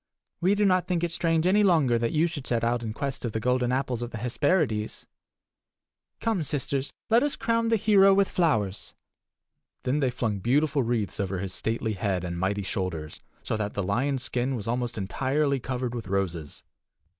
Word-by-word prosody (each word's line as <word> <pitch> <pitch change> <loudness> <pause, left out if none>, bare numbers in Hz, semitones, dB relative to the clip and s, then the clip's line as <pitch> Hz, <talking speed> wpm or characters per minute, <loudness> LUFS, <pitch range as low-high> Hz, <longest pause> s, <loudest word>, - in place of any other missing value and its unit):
We 185 +3 +3
do 205 0 +2
not 185 -2 +3
think 175 -2 0
it 170 - 0
strange 165 -1 +1
any 195 +3 +4
longer 155 - +4
that 115 0 0
you 160 +2 +3
should 160 -6 -4
set 115 -1 0
out 120 +1 +1
in 110 -2 -4
quest 140 +3 -4
of 115 -3 -3
the 110 - -1
golden 125 +1 +1
apples 130 -2 -1
of 120 - -3
the 120 - -6
Hesperides. 125 - 0 1.1
Come, 225 -6 0
sisters, 140 -1 -2 0.2
let 230 +2 +6
us 290 0 +1
crown 230 0 0
the 225 - +3
hero 200 -2 +5
with 195 0 +4
flowers!" 110 - 0 0.9
Then 135 +4 +1
they 135 -3 +2
flung 115 -5 -2
beautiful 140 +7 +2
wreaths 115 -4 -1
over 95 -1 -1
his 95 0 -4
stately 110 +1 -1
head 95 -2 -1
and 85 -1 -4
mighty 100 +2 0
shoulders, 90 -5 -4 0.2
so - - -2
that 105 -1 -3
the 100 - -1
lion's 125 +7 0
skin 125 +2 -1
was 110 -3 -5
almost 120 0 -2
entirely 135 +8 0
covered 125 -1 -3
with 115 -5 -5
roses. 90 -6 -3
125 Hz, 190 wpm, -27 LUFS, 105-160 Hz, 1.1 s, let